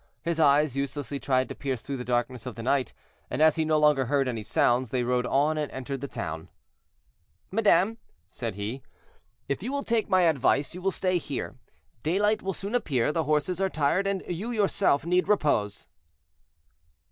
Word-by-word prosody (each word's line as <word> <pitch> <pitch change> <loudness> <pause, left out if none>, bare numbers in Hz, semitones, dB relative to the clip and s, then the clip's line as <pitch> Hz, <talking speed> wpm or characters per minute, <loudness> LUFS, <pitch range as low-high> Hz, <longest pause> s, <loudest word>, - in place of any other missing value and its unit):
His 170 0 -1
eyes 145 -2 +4
uselessly 140 0 -3
tried 130 -2 +1
to - - -4
pierce 130 -4 -4
through 140 -1 -4
the 125 - -5
darkness 120 0 -2
of 125 - -6
the 115 - -7
night, 130 -1 +1 0.4
and - - -3
as 155 0 +5
he 160 - +1
no 155 0 +2
longer 150 -3 +4
heard 135 +1 +1
any 115 -3 -2
sounds, 120 +3 +1
they 125 +1 0
rode 125 0 0
on 150 +4 +2
and 150 - -3
entered 130 +1 -5
the 140 - -4
town. 80 - -6 1.0
"Madame," 210 +1 +3 0.3
said 115 -3 -4
he, 105 +6 -4 0.7
"if 140 - -2
you 240 +7 -4
will 280 0 -2
take 230 -2 0
my 185 -1 +4
advice, 140 -3 +2
you 180 - -8
will 195 - +1
stay 185 -1 0
here; 140 -5 -5 0.5
daylight 205 - +1
will 195 0 -2
soon 200 +5 -6
appear, 145 - +1
the 160 0 -1
horses 155 +5 0
are 190 - +2
tired, 165 +5 +1
and 195 -1 -1
you 185 +7 -4
yourself 200 -9 +1
need 180 +2 +2
repose." 145 - +1
145 Hz, 185 wpm, -27 LUFS, 130-185 Hz, 1.0 s, as